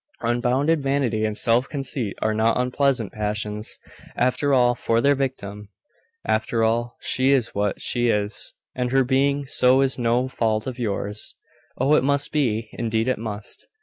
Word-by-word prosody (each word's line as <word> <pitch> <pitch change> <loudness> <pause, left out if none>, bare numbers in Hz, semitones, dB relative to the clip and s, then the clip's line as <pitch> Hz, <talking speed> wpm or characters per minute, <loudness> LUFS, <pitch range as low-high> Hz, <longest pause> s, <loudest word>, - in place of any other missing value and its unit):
Unbounded 125 +6 +1
vanity 135 -6 0
and 105 -1 -2
self 120 +3 +2
conceit 135 -7 -3
are 110 - +1
not 110 +1 +2
unpleasant 125 -3 0
passions, 105 0 -3 0.4
after 130 +3 +1
all, 125 -2 +4
for 115 -1 0
their 140 +4 +4
victim. 105 -7 -4 0.6
After 115 +1 0
all, 120 +2 0
she 130 +1 +1
is 135 -4 +2
what 100 -1 -1
she 120 0 0
is, 105 -1 -1 0.2
and 125 -1 -2
her 135 +1 +3
being 140 +2 +1
so 130 0 +4
is 135 -1 +1
no 120 +2 +1
fault 110 -4 -1
of 130 -1 -5
yours. 105 -2 -2 0.4
Oh, 135 +4 +2
it 150 - +4
must 140 +1 +1
be! 115 -7 0
indeed 115 0 -1
it 130 - 0
must! 105 -2 -4
120 Hz, 160 wpm, -23 LUFS, 110-135 Hz, 0.6 s, all